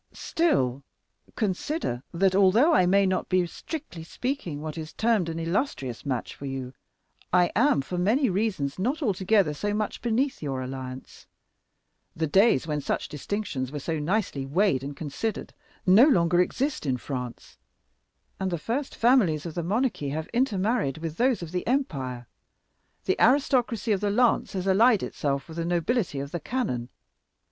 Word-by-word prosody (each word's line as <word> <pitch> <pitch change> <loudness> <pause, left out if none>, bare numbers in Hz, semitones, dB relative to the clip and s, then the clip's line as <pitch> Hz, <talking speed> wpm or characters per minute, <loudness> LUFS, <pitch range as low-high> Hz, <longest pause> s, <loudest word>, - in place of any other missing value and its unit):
"Still, 140 - 0 0.5
consider 205 - -2
that 185 +2 +2
although 200 - +5
I 180 - +4
may 200 +2 +4
not 185 -1 -1
be, 185 -1 +3
strictly 275 - -7
speaking, 185 - -4
what 155 0 -5
is 155 -1 -7
termed 220 -7 +1
an 165 - -4
illustrious 165 - -2
match 130 -3 -2
for 140 - -8
you, 135 -1 -5 0.6
I 180 -1 +4
am, 140 - +4
for 180 +5 -4
many 235 +10 +3
reasons, 185 - -1
not 270 - -1
altogether 195 - +2
so 205 +7 -2
much 215 -1 -3
beneath 245 +4 0
your 135 -4 -3
alliance. 130 0 -8 0.9
The 160 - 0
days 190 - +4
when 150 -2 -2
such - - -2
distinctions 150 -5 -3
were 150 - -5
so 160 +3 -2
nicely 170 -3 -1
weighed 140 -1 +1
and 140 0 -6
considered 160 +8 -4 0.3
no 200 +9 +7
longer 175 - +4
exist 260 - -1
in 130 -2 +1
France, 125 - -7 0.8
and 190 -1 -1
the 175 - -1
first 245 - -3
families 215 - +3
of 165 - -5
the 175 - -2
monarchy 205 - -1
have 155 +3 -3
intermarried 220 - +1
with 160 0 -5
those 245 -5 +2
of 165 - -7
the 180 0 -3
empire. 135 - -2 0.8
The - - 0
aristocracy 250 -3 +3
of 200 -2 +1
the 205 - +1
lance 235 +2 +2
has 185 -1 -3
allied 210 +3 +4
itself 140 -2 -2
with 160 0 -10
the 165 - -1
nobility 175 - 0
of 140 +1 -5
the 175 - -3
cannon. 150 - -2
180 Hz, 160 wpm, -26 LUFS, 145-225 Hz, 0.9 s, no